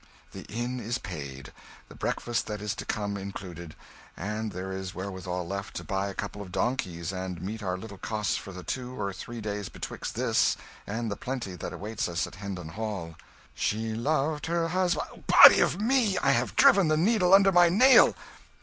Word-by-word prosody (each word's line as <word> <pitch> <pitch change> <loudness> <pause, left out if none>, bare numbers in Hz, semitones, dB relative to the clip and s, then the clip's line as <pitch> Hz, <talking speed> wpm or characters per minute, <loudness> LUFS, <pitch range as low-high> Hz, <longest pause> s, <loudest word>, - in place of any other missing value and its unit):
"The - - -9
inn 120 +3 -3
is 120 +2 -2
paid 70 -3 -8 0.3
the - - -13
breakfast 120 -1 -2
that 105 -1 -4
is 105 0 -2
to 115 - -7
come, 100 -2 -2
included 90 -4 -8 0.4
and 105 +3 -3
there 95 +1 -5
is 95 -1 -5
wherewithal 95 -2 -4
left 100 +2 -5
to - - -4
buy 100 -2 -1
a 100 - -6
couple 100 0 -5
of 95 -3 -9
donkeys 90 -7 -2
and 95 -2 -4
meet 105 +6 -5
our 90 -2 -2
little 100 -1 -10
costs 105 -2 -1
for 100 - -6
the 90 -1 -9
two 125 +3 -5
or 100 0 -2
three 120 +5 -7
days 105 -2 -4
betwixt - - -6
this - - +2 0.3
and 110 +1 -3
the - - -2
plenty 125 -7 -4
that 90 - -6
awaits 105 -2 -3
us 85 -1 -1
at - - -11
Hendon 95 -5 -5
Hall 100 -3 -5 0.4
"'She 110 +1 -1
loved 150 +6 0
her 165 0 0
hus 180 0 +1 0.2
' - - -19
"Body - - +9
o' - - +4
me! 220 -2 +2
I 140 - +3
have 125 -2 0
driven 230 - +6
the 155 0 +2
needle 185 +1 +3
under 195 0 +7
my 175 -1 +6
nail! 255 +9 +6
105 Hz, 195 wpm, -28 LUFS, 95-135 Hz, 0.4 s, Body